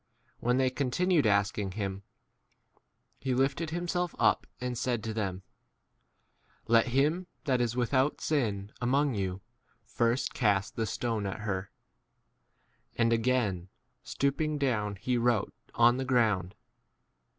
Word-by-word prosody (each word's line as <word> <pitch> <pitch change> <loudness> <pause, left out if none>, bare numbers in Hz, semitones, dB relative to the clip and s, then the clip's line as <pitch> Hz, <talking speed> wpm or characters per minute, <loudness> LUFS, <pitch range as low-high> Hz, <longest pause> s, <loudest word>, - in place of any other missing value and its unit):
When 125 +1 +1
they 130 -1 +2
continued 145 +3 +1
asking 100 -1 +1
him, 100 -2 -3 1.2
he 130 -2 -1
lifted 140 +5 0
himself 175 +1 -2
up - - +2
and 125 0 -3
said 120 -2 -1
to 110 - -3
them, 95 -4 -3 1.2
Let 115 +2 +4
him 150 +8 +1 0.2
that 130 -3 +2
is 120 -1 0
without 130 +3 +1
sin 105 -9 -1
among 135 +3 +2
you 95 -2 -3 0.4
first 120 +2 0
cast 100 -5 +1
8 - - -41
the 115 - 0
stone 110 -1 -2
at 95 - -5
her. 100 -2 -3 1.3
And 115 0 +3
again 110 -7 0 0.3
stoop 140 +2 -1
ing 155 -1 0
down 110 -7 0
he 120 +5 -1
wrote 120 -3 +1 0.2
on 120 +1 +5
the 130 - -1
ground. 110 -8 +1
120 Hz, 130 wpm, -30 LUFS, 105-135 Hz, 1.3 s, on